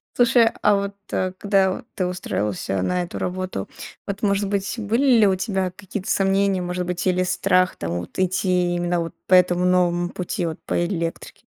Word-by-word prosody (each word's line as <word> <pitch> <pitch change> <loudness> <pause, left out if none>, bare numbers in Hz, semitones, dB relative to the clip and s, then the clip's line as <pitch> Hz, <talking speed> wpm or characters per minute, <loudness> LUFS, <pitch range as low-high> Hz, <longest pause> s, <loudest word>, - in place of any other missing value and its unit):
Слушай, 235 -1 +5
а 210 - +4
вот, 200 0 -2 0.2
э, 185 0 -1
когда 195 -2 +2
в - - -14
ты 185 - 0
устраивался 105 - -2
на 180 - 0
эту 175 - -7
работу, 185 - -4 0.4
вот, 200 0 -4
может 200 0 +1
быть, 200 +1 -1
были 225 +6 +1
ли 210 - +6
у 190 - +3
тебя 190 -1 -1
какие-то 195 0 -7
сомнения, 195 -1 +2
может 180 0 -3
быть, 180 0 -3
или 185 0 +2
страх 185 0 +2
там 85 - -4
вот 90 - -9
идти 180 -1 +1
именно 175 0 0
вот 165 0 -4
по 185 - +1
этому 180 0 +5
новому 175 -1 +2
пути, 180 0 -3
вот 160 -1 -4
по 175 - 0
электрике? 170 -2 -5
185 Hz, 185 wpm, -22 LUFS, 175-195 Hz, 0.4 s, ли